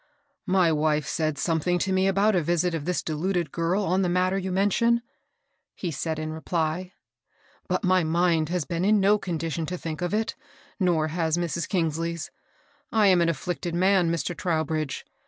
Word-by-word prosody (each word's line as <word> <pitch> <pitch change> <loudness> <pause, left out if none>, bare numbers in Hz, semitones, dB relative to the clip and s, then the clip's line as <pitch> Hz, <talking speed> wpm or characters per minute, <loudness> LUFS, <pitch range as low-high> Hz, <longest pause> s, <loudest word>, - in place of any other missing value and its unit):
*^My 180 -4 +3
wife 150 0 +1
said 155 -2 -1
something 170 +2 +1
to 190 +2 -1
me 190 +1 +2
about 200 +3 +3
a 180 - +3
visit 175 +2 0
of 160 -3 -3
this 180 0 -1
deluded 170 0 -1
girl 175 +5 0
on 185 +1 +1
the 180 - +1
matter 185 +1 +1
you 190 -1 -2
men 195 +2 +2
tion," 235 +2 +2 0.7
he 175 - -4
said 160 +2 -3
in 155 0 -4
reply; 165 +2 -2 0.8
^^but - - 0
my 185 -1 +3
mind 165 -1 +2
has 175 -4 -1
been 170 0 -2
in 210 +2 +4
no 205 +2 +4
condition 165 -3 -3
to 180 - -3
think 160 -2 -5
of 175 - -1
it, 220 +2 -1 0.4
nor 170 -5 +2
has 165 0 0
Mrs. 170 -1 -2
Eongaley's. 165 -1 -1 0.6
I 220 -2 +3
am 180 -2 +5
an 170 - +3
afflicted 170 +2 -3
man, 185 -1 +3
Mr. 170 +1 -2
Trowbridge. 155 -4 -2
175 Hz, 180 wpm, -26 LUFS, 160-185 Hz, 0.8 s, am